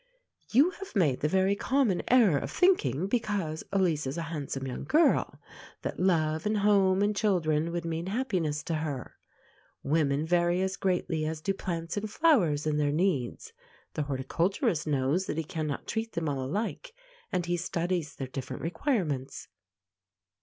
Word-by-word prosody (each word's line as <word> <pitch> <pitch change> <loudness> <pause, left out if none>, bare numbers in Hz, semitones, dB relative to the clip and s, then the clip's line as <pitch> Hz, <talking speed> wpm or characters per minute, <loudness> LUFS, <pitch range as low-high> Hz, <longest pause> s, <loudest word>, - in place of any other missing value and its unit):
You 280 +10 +5
have 390 -8 -10
made 150 -10 +2
the 150 - +1
very 190 +4 +2
common 245 -5 +1
error 220 - +5
of - - -5
thinking, 180 - +2
because 200 -8 -1
Elise 175 -7 +1
is 135 +5 -4
a 165 - -2
handsome 135 -3 -4
young 130 - -5
girl, 315 +2 +2 0.4
that - - -4
love, 160 -2 +1
and 215 0 +1
home, 200 -2 +4
and 205 0 +1
children 170 -6 +1
would 170 0 -3
mean 165 +1 -3
happiness 185 - -1
to 165 - -3
her. 145 -5 -5 0.7
Women 145 0 +1
vary 175 +1 +2
as 190 0 -1
greatly 180 -4 -1
as 160 0 -3
do 195 +5 -1
plants 170 -2 -4
and 210 +1 -2
flowers 205 - +3
in 155 -1 +1
their 145 -1 +2
needs. 150 -7 -1 0.4
The - - -2
horticulturist 160 - -1
knows 145 +6 +1
that - - -3
he 165 - 0
cannot 150 -2 -4
treat 225 0 -3
them 165 -1 -2
all 140 -2 -1
alike, 220 - -3 0.4
and 175 - 0
he 175 0 0
studies 175 -2 -2
their 135 - -4
different 130 0 -6
requirements. 165 - -2
170 Hz, 160 wpm, -29 LUFS, 150-200 Hz, 0.7 s, You